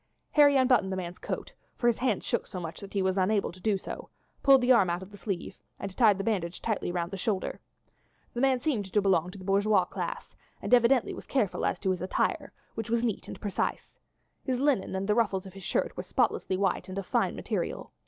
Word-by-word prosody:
Harry 290 -2 +6
unbuttoned 250 -7 +3
the 190 - -2
man's 175 -1 -5
coat, - - -5 0.2
for 240 - -4
his 240 -2 +4
hands 245 -6 0
shook - - -1
so 185 - -6
much 165 -2 -6
that 200 - -10
he 195 - +2
was 190 +1 +1
unable 200 +2 +1
to 185 - -15
do 205 +1 +1
so, - - -8 0.3
pulled 270 -2 +6
the 250 +1 +3
arm 210 -8 +5
out 175 +2 -2
of 190 - -13
the 205 - -11
sleeve, 195 -3 -5 0.2
and 195 -1 -6
tied 215 -5 +5
the 195 - -3
bandage 185 -6 -1
tightly 215 -5 -2
round 175 -1 -2
the 195 - -4
shoulder. 195 -1 -2 0.7
The 240 - -2
man 265 -2 +3
seemed 235 -9 -1
to 210 - +3
belong 185 -4 +2
to 180 - -10
the 185 - -10
bourgeois 200 -1 +3
class, - - -5 0.2
and - - -2
evidently 245 +1 +4
was - - -9
careful 235 -9 0
as - - -1
to 190 - +1
his 185 - -2
attire, 185 - -1 0.2
which 225 0 -5
was 235 0 +1
neat 225 -5 -2
and - - -8
precise. 205 -3 -3 0.4
His 255 -2 -1
linen 265 -9 +1
and 190 +1 -2
the 210 - +3
ruffles 200 -4 +1
of 190 - -10
his 195 - -10
shirt - - -1
were - - -3
spotlessly 185 - 0
white 195 -1 0
and 185 - -6
of 195 - -3
fine - - +1
material. - - -3
200 Hz, 230 wpm, -29 LUFS, 185-235 Hz, 0.7 s, Harry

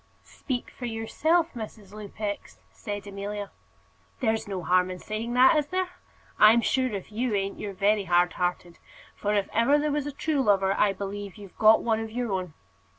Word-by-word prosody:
"Speak 255 -3 -5
for 245 - -6
yourself, 315 +10 0
Mrs. 215 -3 -9
Lupex," 210 0 -6
said 205 -1 -6
Amelia. 200 0 -5 0.7
"There's 220 -4 0
no 190 -3 -4
harm 180 +1 +3
in 185 - -5
saying 220 +5 -4
that, 255 +4 +6
is 295 -1 +1
there? 370 +2 -1 0.5
I'm 220 +2 +7
sure, 260 +2 +1
if 200 -2 -6
you 230 +1 -1
ain't, 195 0 -2
you're 205 -1 -5
very 200 +1 +2
hard 175 0 +3
hearted; 175 -1 -3 0.4
for, 210 0 -1
if 200 -1 +1
ever 235 +6 +4
there 300 0 0
was 290 0 -1
a - - -3
true 290 +1 -1
lover, 195 -4 +3
I 200 0 +3
believe 200 0 -6
you've 200 -3 -12
got 220 0 +6
one 225 -2 +1
of 225 0 -4
your 240 0 -3
own. 185 -4 -3
210 Hz, 185 wpm, -27 LUFS, 195-240 Hz, 0.7 s, I'm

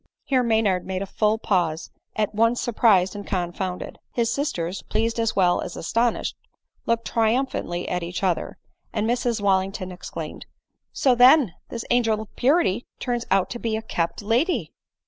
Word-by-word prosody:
Here 260 -2 +2
Maynard 220 -6 +2
made 190 0 -3
a - - -4
full 215 +2 +1
pause 175 -7 0
— - - -50
at 215 -1 0
once 230 +3 +2
surprised 210 -5 +3
and 205 - -5
confounded. 180 -1 -3
His 230 -1 0
sisters, 185 - -2
pleased 230 +1 -1
as 225 -1 0
well 180 -2 +3
as 175 - -6
aston 230 +7 +1
ished, - - -4 0.5
looked 230 0 +1
triumphantly 225 -6 0
at 180 - -1
each 175 +3 -5
other; 180 -3 -1 0.3
and 215 -1 -1
Mrs 240 -2 0
Wal 195 -2 +4
lington 190 -1 -5
exclaimed, 180 - -7
• - - -42 0.2
' - - -56
So 260 - +3
then, 250 - +6 0.2
this 230 - -5
angel 225 -3 +3
of 220 -2 -10
purity, 250 - +2 0.2
turns 240 -2 -2
out 190 -1 +2
to 240 - -4
be 225 -2 -1
a 220 - -6
kept 170 -2 -2
lady 245 - +1
220 Hz, 180 wpm, -24 LUFS, 185-235 Hz, 0.5 s, then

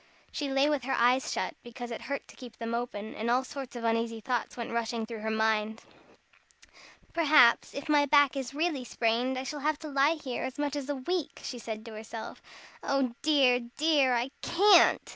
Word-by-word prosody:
She 290 -2 -3
lay 270 +1 +3
with 290 -5 0
her 270 - 0
eyes 250 +2 +3
shut, - - -2
because 240 0 -8
it 230 - -5
hurt 280 0 -5
to - - -15
keep 250 -3 -12
them 230 0 -4
open, 225 -3 -4
and 225 +2 -3
all 250 +2 +3
sorts 265 -1 -8
of 240 - -6
uneasy 230 0 0
thoughts 245 +1 -3
went 235 - -5
rushing 230 -1 -2
through 225 -1 -7
her 220 +1 -3
mind. 220 0 0 1.3
"Perhaps, 300 -8 +5
if 280 - -6
my 295 -1 +3
back 285 -1 +4
is 270 0 -5
really 310 -4 -1
sprained, 245 +2 0
I 260 - -3
shall 295 +2 -5
have 305 +1 0
to 315 - -9
lie 280 +3 +3
here 265 -6 -5
as 260 - -5
much 290 0 -2
as 285 -1 -5
a 290 - -1
week," 330 +5 -3
she 245 - -6
said 220 -1 -6
to 230 - -9
herself. 220 +1 -8 0.4
"Oh 270 -3 0
dear, 275 -5 +4 0.2
dear! 290 -5 +3
I 240 +3 -1
can't. 400 +4 +5
255 Hz, 200 wpm, -29 LUFS, 235-285 Hz, 1.3 s, Perhaps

